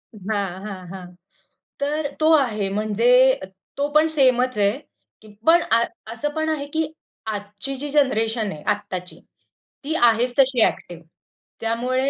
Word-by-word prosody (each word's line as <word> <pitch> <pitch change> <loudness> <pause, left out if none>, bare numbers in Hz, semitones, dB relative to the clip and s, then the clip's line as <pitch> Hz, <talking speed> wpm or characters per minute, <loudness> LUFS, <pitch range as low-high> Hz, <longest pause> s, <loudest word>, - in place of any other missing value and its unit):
हां, 200 0 -2 0.2
हां, 195 -3 -7
हां. 185 -1 -8 0.7
तर 290 +1 -1
तो 315 +1 +4
आहे, 225 -9 +2
म्हणजे 235 +6 +3 0.4
तो 285 +1 0
पण 305 +1 +5
सेमच 255 -5 +2
आहे, 200 -1 +3 0.5
की 215 - -16 0.2
पण 340 +2 +6
अ 230 +1 +5 0.3
असं 235 +6 -2
पण 315 0 -1
आहे, 300 -3 -2
की 320 -1 0 0.4
आजची 210 +5 -4
जी 290 +2 -5
जनरेशन 225 -7 +1
आहे, 150 - -9
आत्ताची. 195 -3 -3 0.6
ती 300 +3 -2
आहेच 240 -2 +3
तशी 260 -3 +4
एक्टिव्ह. 175 -1 -7 0.6
त्यामुळे, 250 +4 0
245 Hz, 140 wpm, -22 LUFS, 210-280 Hz, 0.7 s, पण